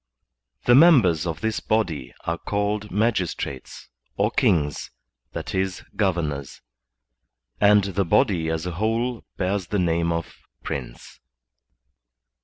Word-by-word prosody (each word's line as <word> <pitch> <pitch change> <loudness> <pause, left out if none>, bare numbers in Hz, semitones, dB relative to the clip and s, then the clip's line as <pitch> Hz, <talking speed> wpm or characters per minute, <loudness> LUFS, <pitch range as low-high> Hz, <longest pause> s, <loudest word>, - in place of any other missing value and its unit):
The 120 - +5
members 120 - +6
of 85 0 -4
this 110 -1 -1
body 80 - -1
are 85 +1 -2
called 105 +1 -2
magistrates 95 - -2 0.3
or - - +2
KINGS, 75 -5 +1 0.4
that - - -5
is, 95 -1 -2
governors; 80 -9 -1 1.0
and 105 0 +5
the 100 0 -1
body 85 -4 +2
as 80 +1 -2
a 90 - -3
whole 115 +6 -1
bears 95 -1 -1
the 105 - -1
name 85 -2 +1
of 85 0 -4 0.2
PRiNCEf. - - -7
95 Hz, 115 wpm, -24 LUFS, 85-105 Hz, 1.0 s, members